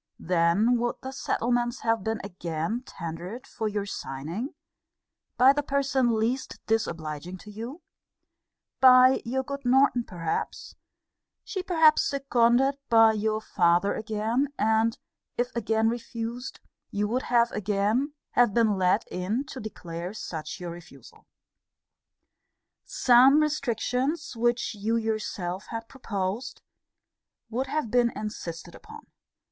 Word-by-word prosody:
Then 180 +8 +2
would 240 0 -1
the 265 - -5
settlements 240 -1 -1
have 225 -3 +1
been 220 +1 -2
again 175 +3 -3
tendered 170 +8 -7
for 220 -3 -4
your 205 -1 -2
signing, 170 - -5 0.8
by 260 +2 +7
the 290 - 0
person 270 -4 +1
least 240 +4 -2
disobliging 170 -5 -2
to 210 +4 -12
you; 240 - -8 1.0
by 255 0 +7
your 265 +3 -1
good 280 +1 -6
Norton 255 -1 +4
perhaps; 170 -7 -4 0.7
she 380 - -4
perhaps 320 -4 +4
seconded 270 0 +2
by 225 -1 +7
your 215 0 0
father 175 -2 +2
again; 220 +5 -1
and, 220 +1 +2 0.4
if 245 +1 -1
again 225 -1 +1
refused, 235 +1 -4 0.3
you 205 +1 -1
would 245 +4 0
have 235 -1 +3
again 210 +8 0 0.2
have 240 -4 +3
been 220 -4 +3
led 185 +4 +3
in 200 +8 -1
to 265 - -7
declare 180 -3 -6
such 160 -7 -6
your 175 -1 -5
refusal. 170 0 -14 1.6
Some 255 +4 +5
restrictions 285 0 -1
which 240 +1 0
you 215 +2 -1
yourself 210 -5 -3
had 225 0 -6
proposed, 225 -1 -4 0.9
would 255 +4 -1
have 300 -6 -2
been 245 -1 +4
insisted 175 -5 -6
upon. 445 +1 -12
225 Hz, 120 wpm, -27 LUFS, 200-255 Hz, 1.6 s, by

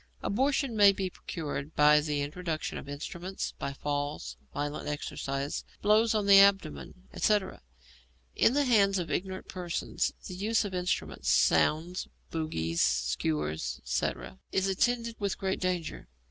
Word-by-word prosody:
Abortion 270 +2 +1
may 205 -2 +7
be 190 -1 -3
procured 150 -4 -5
by 150 0 +6
the 150 -1 -1
introduction 155 +1 -4
of 140 - -10
instruments, 170 +6 -5
by 140 - -3
falls, 145 - -3 0.2
violent 145 +1 -4
exercise, 140 -1 -3 0.2
blows 215 +2 +4
on 210 -2 +1
the 200 -1 +8
abdomen, 195 - +2
etc. 205 - +1 0.7
In 245 - +4
the 290 0 +3
hands 200 -5 +4
of 170 -4 -3
ignorant 190 0 -3
persons 180 -2 -2 0.2
the - - -6
use 215 +4 +1
of 195 - -5
instruments 180 0 -2
(sounds, 170 +4 +2 0.2
bougies, 85 - -2
skewers, 75 +2 0
etc.) 65 - -3
is 190 0 +1
attended 230 +4 0
with 200 -2 -1
great 190 -1 -1
danger. 180 - -2
180 Hz, 135 wpm, -29 LUFS, 145-200 Hz, 0.7 s, the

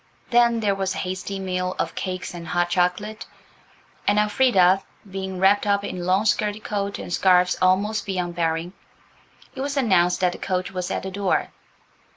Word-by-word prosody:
Then 235 -1 +4
there 205 -2 +2
was 195 -1 -2
a - - -3
hasty 185 +2 -4
meal 185 -1 -2
of - - -2
cakes 185 -2 -4
and 170 -1 -8
hot 175 +1 0
chocolate, 180 +5 -1 0.8
and, 205 - +3
Elfrida 210 -4 +4 0.3
being 190 -1 -5
wrapped 200 +2 +3
up 200 0 +2
in 180 -3 -5
long 190 +3 +2
skirted 210 0 0
coat 200 -1 -3
and 175 - -6
scarves 180 -1 +4
almost 200 +4 +2
beyond 180 -3 -2
bearing, 165 +1 -1 0.8
it - - -6
was 280 +1 -3
announced 180 -8 +3
that 180 -1 +3
the - - -9
coach 185 -1 -2
was 180 -1 -4
at - - -3
the 190 - -5
door. 195 -1 0
190 Hz, 175 wpm, -23 LUFS, 180-205 Hz, 0.8 s, Then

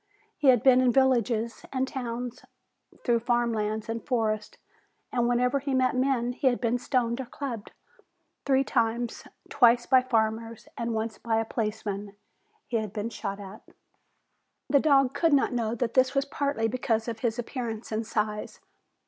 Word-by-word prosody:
He 290 - 0
had 250 -4 +6
been 255 -1 +6
in 255 -1 +4
villages 235 -3 +1
and 260 0 0
towns, 245 -1 -5 0.6
through 235 -2 +3
farm 240 0 +1
lands 215 0 -2
and 225 0 -4
forest, 215 -4 -1 0.5
and 240 -1 +1
wherever 250 +3 +2
he 275 -1 -2
met 255 0 +2
men 255 -2 +1
he 265 - 0
had 245 -2 +2
been 240 0 0
stoned 240 -1 0
or 255 - -8
clubbed. 240 -5 -6 0.7
Three 270 -1 +3
times 235 -2 -1 0.2
twice 240 -3 +4
by 260 -1 +5
farmers 225 -2 -1
and 235 -1 -2
once 220 0 -3
by 225 -1 0
a 225 - -1
policeman 210 -3 -4 0.5
he 235 - -1
had 215 -3 -4
been 220 +1 -3
shot 200 -3 -5
at. 200 +1 -10 1.1
The 280 - +4
dog 275 -3 +4
could 325 +2 +2
not 275 -2 +3
know 230 -2 -1
that 235 0 -2
this 260 +1 +3
was 275 0 +2
partly 280 -5 -1
because 225 -1 -1
of 225 -1 -4
his 235 -1 -1
appearance 235 -2 -5
and 220 +1 -1
size. 210 -1 -3
235 Hz, 165 wpm, -27 LUFS, 225-255 Hz, 1.1 s, had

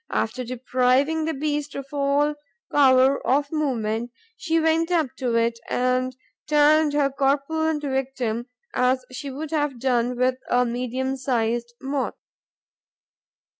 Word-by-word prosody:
After 250 +3 -1
depriving 255 +5 +1
the 320 - -1
beast 295 0 -2
of 275 - -5
all 285 +1 +2 0.4
power 265 -1 +5
of 280 +2 +1
movement, 240 -7 -1 0.3
she 330 -6 0
went 325 +1 +2
up 320 -7 0
to 245 -3 -1
it 230 0 +1
and 255 0 0 0.3
turned 300 0 +4
her 285 -2 +2
corpulent 295 +3 0
victim 260 -4 -2 0.3
as 255 0 +1
she 280 +2 -6
would 295 +3 -6
have 295 -5 -1
done 245 -1 +1
with 255 +1 +2
a 250 0 +3
medium 255 +2 -2
sized 240 -2 -1
Moth. 270 0 -2
265 Hz, 130 wpm, -24 LUFS, 250-295 Hz, 0.4 s, power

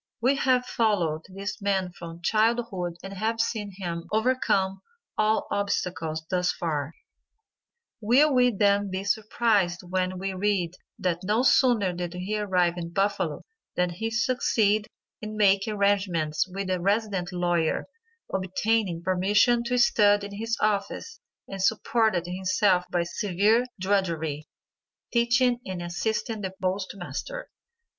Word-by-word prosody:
We 255 +5 +3
have 255 -2 +2
followed 180 -11 0
this 200 +4 -6
man 190 -2 0
from 170 -1 -10
childhood 215 -5 0
and 195 0 -7
have 220 +3 -2
seen 220 -3 -1
him 170 -3 -4
overcome 210 -5 +1 0.3
all 215 +1 +2
obstacles 175 -5 -2
thus 180 -1 +1
far; 155 -3 -3 1.1
will 265 +7 +4
we 250 -1 +5
then 200 -2 +2
be 190 +1 -3
surprised 205 -3 +1
when 185 +1 -1
we 195 +1 -3
read 185 -3 0 0.2
that 180 -5 -1
no 215 +6 +1
sooner 240 -9 +4
did 175 0 -5
he 195 +4 -2
arrive 180 -4 +1
in 170 0 -5
Buffalo 195 -4 -1 0.3
than 180 0 +1
he 220 +6 -3
succeeded 225 -3 +1 0.3
in 215 0 -6
making 200 0 +3
arrangements 190 -6 +1
with 195 0 -3
a 185 - 0
resident 200 -2 0
lawyer, 175 -2 0 0.5
obtaining 190 -1 0
permission 200 +6 +3
to 250 +1 0
study 205 -4 +4
in 200 - -8
his 225 +3 -2
office 215 - -1 0.3
and 195 -1 -6
supported 220 -2 +2
himself 185 +1 +1
by 175 -1 +1
severe 205 +6 +1
drudgery, 165 -6 -1 0.7
teaching 240 +1 +3
and 185 -2 -5
assisting 220 +5 -2
the 190 -1 -5
post 185 +1 -1
master. - - -6
195 Hz, 130 wpm, -26 LUFS, 180-220 Hz, 1.1 s, we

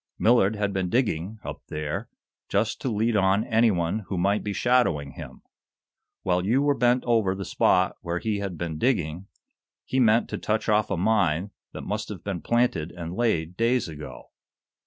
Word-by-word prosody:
Millard 110 -3 +4
had 100 -1 -1
been 95 -2 -1
digging, 110 -4 0
up - - -7
there, 75 -1 -4 0.4
just 105 +3 0
to 130 - -1
lead 110 +1 0
on 100 +1 +3
anyone 110 -5 +2
who 95 - -3
might 100 +4 +1
be 105 - -3
shadowing 95 - +1
him. - - -10 0.8
While 90 -1 +1
you 120 +8 +2
were 145 0 +3
bent 125 -1 +2
over 110 -6 +2
the 95 0 -5
spot 90 +1 +2
where 85 0 -2
he 105 +2 -2
had 95 -4 -4
been 80 -2 -4
digging, 90 - 0 0.6
he 130 - 0
meant 115 -1 +4
to - - -4
touch 110 0 -1
off 105 -1 +2
a 100 - -1
mine 95 -2 +1 0.2
that - - -6
must 105 +1 -3
have 100 -5 -7
been 95 -4 -4
planted 120 -9 +1
and 85 -1 -7
laid 90 -7 0
days 115 +2 +1
ago. 75 -2 -10
100 Hz, 180 wpm, -25 LUFS, 90-115 Hz, 0.8 s, Millard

